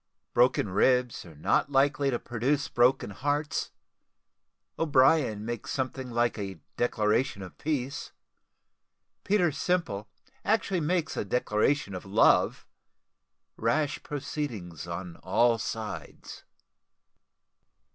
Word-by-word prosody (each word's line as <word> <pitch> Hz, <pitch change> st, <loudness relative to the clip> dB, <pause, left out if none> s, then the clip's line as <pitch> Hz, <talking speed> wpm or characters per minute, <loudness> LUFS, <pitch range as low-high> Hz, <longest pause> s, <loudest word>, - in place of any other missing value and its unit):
BROKEN 120 Hz, -4 st, +3 dB
RIBS 125 Hz, +5 st, +2 dB
NOT 110 Hz, -, +1 dB
LIKELY 140 Hz, 0 st, +3 dB
TO 120 Hz, -, 0 dB
PRODUCE 125 Hz, +5 st, -1 dB
BROKEN 120 Hz, -3 st, +3 dB
HEARTS 145 Hz, +6 st, -1 dB, 1.1 s
O'BRIEN 135 Hz, -7 st, +3 dB
MAKES 120 Hz, -1 st, -5 dB
SOMETHING 130 Hz, -1 st, -3 dB
LIKE 120 Hz, -1 st, 0 dB
A 95 Hz, -4 st, -5 dB, 0.2 s
DECLARATION 110 Hz, -1 st, +1 dB
OF 90 Hz, -, -10 dB
PEACE 140 Hz, -3 st, -3 dB, 1.1 s
PETER 190 Hz, -5 st, +2 dB
SIMPLE 140 Hz, -, -1 dB, 0.3 s
ACTUALLY 195 Hz, -4 st, +1 dB
MAKES 165 Hz, +1 st, 0 dB
A -, -, -1 dB
DECLARATION 105 Hz, +1 st, +1 dB
OF 90 Hz, -, -6 dB
LOVE 100 Hz, +3 st, +3 dB, 0.9 s
RASH 145 Hz, +6 st, 0 dB
PROCEEDINGS 120 Hz, -, -5 dB
ON 85 Hz, 0 st, -6 dB
ALL 115 Hz, +6 st, +2 dB
SIDES. 110 Hz, -1 st, -6 dB
125 Hz, 95 wpm, -28 LUFS, 105-145 Hz, 1.1 s, BROKEN